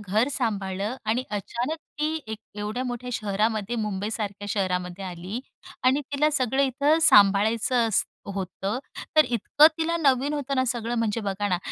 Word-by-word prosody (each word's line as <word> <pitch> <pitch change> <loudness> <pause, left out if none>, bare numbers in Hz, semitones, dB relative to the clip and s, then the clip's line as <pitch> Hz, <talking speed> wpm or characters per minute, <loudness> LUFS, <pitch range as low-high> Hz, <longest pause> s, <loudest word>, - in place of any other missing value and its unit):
घर 210 +5 +1
सांभाळलं 205 -3 -2
आणि 230 +4 +1
अचानक 235 - -3 0.2
ती 305 +1 0
1 220 -1 -5 0.2
एवढ्या 210 +4 -3
मोठ्या 250 0 -4
शहरामध्ये 215 +1 -1
मुंबईसारख्या 205 -1 -3
शहरामध्ये 185 -2 -2
आली 185 +5 -5 0.4
आणि 260 +3 +4
तिला 300 +2 +3
सगळं 265 -1 +1
इथं 280 +4 +2
सांभाळायचं 225 -1 +5
असत 210 - +2 0.3
होतं 195 +3 -3 0.4
तर 310 - +8
इतकं 250 +5 +4
तिला 330 +1 0
नवीन 280 -2 +2
होतं 280 -1 -2
ना 260 - +3
सगळं 240 -1 -1
म्हणजे 230 0 0
बघा 205 0 -2
ना 180 -2 +1
225 Hz, 150 wpm, -25 LUFS, 200-260 Hz, 0.4 s, तर